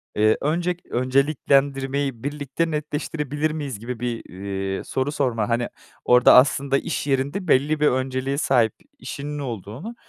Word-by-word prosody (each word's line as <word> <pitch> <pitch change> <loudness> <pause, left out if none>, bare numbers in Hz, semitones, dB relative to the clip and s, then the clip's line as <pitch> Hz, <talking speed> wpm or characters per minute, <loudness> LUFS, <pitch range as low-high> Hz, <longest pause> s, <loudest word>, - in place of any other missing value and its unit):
Eee, 110 +1 +4
öncek 175 +4 -1
önceliklendirmeyi 135 0 +1
birlikte 145 +3 -2
netleştirebilir 150 0 -2
miyiz 140 -8 -5
gibi 120 0 -6
bir, 120 -2 -3
eee, 95 0 -4
soru 135 +2 -2
sorma. 120 -7 0
Hani, 120 +1 0 0.4
orada, 125 0 +7
aslında 135 +1 +4
iş 155 -1 -3
yerinde 140 +8 -1
belli 150 +2 +3
bir 150 - +4
önceliğe 130 +1 -1
sahip 120 -6 +2 0.3
işinin 145 +1 -5
olduğunu, 125 - -6
135 Hz, 130 wpm, -23 LUFS, 125-150 Hz, 0.4 s, orada